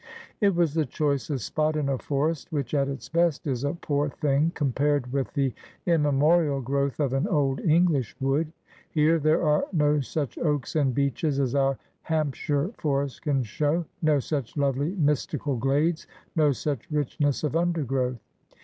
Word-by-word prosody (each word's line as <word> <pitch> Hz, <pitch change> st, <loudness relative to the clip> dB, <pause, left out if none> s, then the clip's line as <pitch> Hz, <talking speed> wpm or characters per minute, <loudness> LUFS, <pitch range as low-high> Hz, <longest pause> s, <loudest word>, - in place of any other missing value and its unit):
It 200 Hz, -4 st, +3 dB
was 170 Hz, -4 st, +2 dB
the 155 Hz, -3 st, 0 dB
choicest 140 Hz, -2 st, -1 dB
spot 155 Hz, 0 st, 0 dB
in 150 Hz, -2 st, 0 dB
a 135 Hz, -2 st, 0 dB
forest 150 Hz, +2 st, -1 dB
which, 145 Hz, -3 st, -3 dB
at 140 Hz, -2 st, +2 dB
its 140 Hz, 0 st, -5 dB
best, 170 Hz, -2 st, +1 dB
is 130 Hz, -3 st, -2 dB
a 145 Hz, +4 st, -1 dB
poor 145 Hz, -3 st, -1 dB
thing 145 Hz, +2 st, +1 dB
compared 140 Hz, -2 st, 0 dB
with 135 Hz, -1 st, -1 dB
the 135 Hz, -4 st, 0 dB, 0.3 s
immemorial 150 Hz, -1 st, +3 dB
growth 140 Hz, +2 st, -1 dB
of 140 Hz, -4 st, +1 dB
an 135 Hz, +7 st, +1 dB
old 140 Hz, -8 st, +1 dB
English 155 Hz, -, +2 dB
wood. 140 Hz, +4 st, 0 dB, 0.4 s
Here 160 Hz, +1 st, +3 dB
there 155 Hz, +3 st, +2 dB
are 150 Hz, -2 st, +3 dB
no 150 Hz, -4 st, +2 dB
such 140 Hz, 0 st, -3 dB
oaks 150 Hz, -4 st, -1 dB
and 135 Hz, -5 st, +2 dB
beeches 140 Hz, +1 st, 0 dB
as 130 Hz, -3 st, 0 dB
our 135 Hz, -1 st, +2 dB, 0.2 s
Hamp 155 Hz, -3 st, 0 dB
shire 145 Hz, +6 st, -1 dB
forest 140 Hz, -2 st, -1 dB
can 140 Hz, -4 st, 0 dB
show 150 Hz, +9 st, 0 dB
— -, -, -41 dB
no 155 Hz, -2 st, +3 dB
such 135 Hz, -1 st, -3 dB
lovely 140 Hz, +5 st, 0 dB
mystical 150 Hz, -3 st, 0 dB
glades 145 Hz, +7 st, 0 dB
— -, -, -35 dB
no 155 Hz, -3 st, +4 dB
such 140 Hz, -2 st, -3 dB
richness 145 Hz, -1 st, 0 dB
of 150 Hz, 0 st, -1 dB
undergrowth. 135 Hz, -7 st, 0 dB
145 Hz, 170 wpm, -26 LUFS, 135-155 Hz, 0.4 s, no